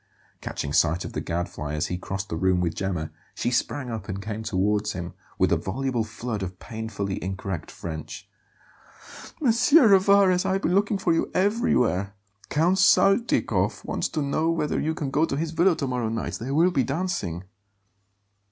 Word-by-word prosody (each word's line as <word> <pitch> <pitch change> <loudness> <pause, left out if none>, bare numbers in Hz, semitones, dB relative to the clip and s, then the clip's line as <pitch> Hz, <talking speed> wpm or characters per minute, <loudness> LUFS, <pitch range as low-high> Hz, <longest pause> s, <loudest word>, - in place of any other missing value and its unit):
Catching 70 - -4
sight 85 +2 +2
of - - -7
the - - -3
Gadfly 80 -3 -3
as 75 - 0
he 90 - -3
crossed 95 +2 -5
the - - -3
room 90 +2 +2
with 85 -2 0
Gemma, 90 -5 -3 0.2
she 120 - -1
sprang 125 +1 -1
up 110 -3 -6
and 95 +1 -3
came 110 +2 -5
towards 105 0 0
him, 85 -1 -6 0.2
with - - +2
a - - +4
voluble 125 +3 -2
flood 110 -1 -5
of 95 -1 -5
painfully 105 -4 -5
incorrect 95 -2 -4
French. 80 -3 -7 1.2
"M. 235 - +5 0.2
Rivarez, 200 - +5
I - - 0
have 195 - -1
been 175 - +1
looking 200 +1 +2
for 190 -3 +1
you 165 - 0
everywhere! 125 - +1 0.3
Count 175 +6 +2
Saltykov 195 +4 +3
wants - - -2
to 155 - -2
know 155 +3 0
whether 165 -3 0
you 160 +1 -1
can 145 -5 -3
go 150 +3 +2
to 140 -4 0
his 160 +1 -2
villa 170 +2 +3
to 140 - -2
morrow 125 -3 -1
night. 115 0 -3
There 135 +4 -3
will 170 +4 +4
be 135 -7 +2
dancing." 135 - -2
115 Hz, 180 wpm, -25 LUFS, -, 1.2 s, M